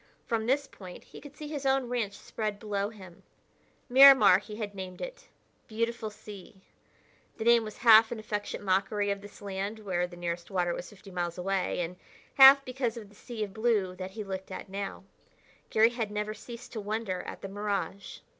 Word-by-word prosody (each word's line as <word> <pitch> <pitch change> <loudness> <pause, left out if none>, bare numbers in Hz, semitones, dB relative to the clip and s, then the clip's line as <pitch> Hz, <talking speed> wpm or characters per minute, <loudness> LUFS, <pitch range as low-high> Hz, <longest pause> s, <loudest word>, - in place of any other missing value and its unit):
From 225 -2 -1
this 280 +3 +2
point 185 -8 -12
he - - -13
could 290 0 -13
see 300 - -7
his 295 -2 -5
own 270 -2 +2
ranch 230 -5 -2
spread 215 -2 -4
below 205 -1 -2
him. 185 -6 -14 0.7
Miramar, 265 -6 +8
he 210 +1 -10
had 210 -2 -5
named 185 -2 -7
it - - -8 0.4
"Beautiful 230 0 -2
Sea." 205 -1 -12 0.8
The 220 - -4
name 235 0 +5
was 215 -1 -8
half 225 -1 +7
an 240 - -3
affectionate 210 -1 -4
mockery 200 +2 +1
of 200 0 -3
this 205 0 -13
land 200 +2 -4
where 185 -4 -2
the 175 0 -13
nearest 170 0 -4
water 180 -3 0
was 175 - -6
fifty 200 -1 -14
miles 175 -1 -3
away, 190 0 -1
and 175 +1 -5 0.4
half 275 0 +9
because 250 -2 -2
of 210 -3 -9
the 205 - -20
sea 230 0 -6
of 200 -2 -6
blue 215 -5 +1
that 185 0 -6
he 215 - -3
looked 190 -1 -6
at 190 - -8
now. 195 0 -5 0.7
Garry 225 +2 +4
had 230 -3 -3
never 210 +1 -3
ceased 240 +2 -10
to 220 - -4
wonder 205 -3 -3
at - - -8
the - - -4
mirage. 200 -1 -4
210 Hz, 190 wpm, -29 LUFS, 190-230 Hz, 0.8 s, half